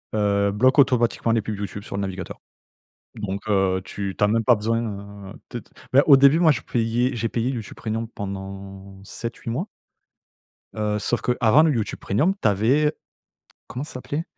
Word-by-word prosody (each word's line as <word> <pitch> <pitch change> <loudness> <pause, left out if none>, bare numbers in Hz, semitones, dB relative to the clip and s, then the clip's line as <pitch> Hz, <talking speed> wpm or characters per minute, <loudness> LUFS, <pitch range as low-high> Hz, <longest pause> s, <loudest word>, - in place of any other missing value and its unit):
heu, 100 -1 +2
bloque 130 +8 +3
automatiquement 120 -4 +3
les 115 -1 +2
pubs 105 0 -5
YouTube 100 0 -6
sur - - -7
le - - -1
navigateur. 95 -1 -5 0.8
Donc 100 -2 -4
heu, 95 -2 +2
tu 100 -1 -5
tu - - +3
as - - +5
même 115 +2 +1
pas 120 - +6
besoin, 115 +2 0 0.5
heu, - - -11 0.2
de 120 - -4
de - - -21 0.3
bah, 135 +2 +6
au 140 - +9
début, 140 +4 +5
moi, 165 -3 +6
je 115 - -3
payais. 120 +3 0
J'ai 115 0 -1
payé 115 +3 -1
YouTube 115 -5 -6
Premium 115 +1 -3
pendant 95 -1 -8
7-8 115 +3 -6
mois 135 - -2 1.1
heu, 105 -1 -1
sauf 115 +3 -1
qu'avant 125 +3 +4
le 160 -1 +3
YouTube 110 -3 -2
Premium, 155 - +1
tu - - +3
avais, 130 +10 +2 0.8
comment 130 - -5
ça 150 - -10
s'appelait? 145 +5 -4
110 Hz, 185 wpm, -23 LUFS, 100-125 Hz, 1.1 s, au